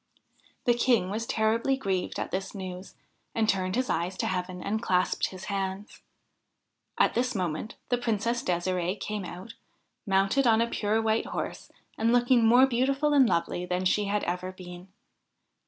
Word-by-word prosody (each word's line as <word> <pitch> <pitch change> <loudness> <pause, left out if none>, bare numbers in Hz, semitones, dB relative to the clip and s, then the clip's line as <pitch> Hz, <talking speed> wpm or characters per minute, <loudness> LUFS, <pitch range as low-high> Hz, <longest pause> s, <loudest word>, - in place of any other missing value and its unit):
The 240 - +5
King 235 -6 +2
was 225 +2 -3
terribly 230 +5 +1
grieved 190 -7 -2
at - - -4
this 190 +2 -3
news, 185 -1 -7 0.4
and 225 -1 +2
turned 185 -2 0
his 255 +1 0
eyes 175 +3 -1
to - - -1
heaven 180 -1 -3
and 220 +2 -1
clasped 185 -5 +1
his 185 -1 -10
hands. 195 0 -4 1.0
At - - +3
this 250 +1 0
moment 180 +2 -3
the 245 - +1
Princess 235 0 0
De'sirde 180 -1 -1
came 210 0 -4
out, 185 +6 -8 0.5
mounted 195 +7 +3
on 225 -1 +5
a 230 - +3
pure 220 -1 0
white 220 0 +1
horse - - -5 0.3
and 225 +1 +3
looking 245 0 +4
more 245 +4 +7
beautiful 270 +4 +1
and 270 -4 +5
lovely 170 +1 0
than 180 +1 -2
she 205 +3 +2
had 205 +1 -1
ever 180 +1 -3
been. 180 -1 -11
205 Hz, 165 wpm, -28 LUFS, 185-235 Hz, 1.0 s, more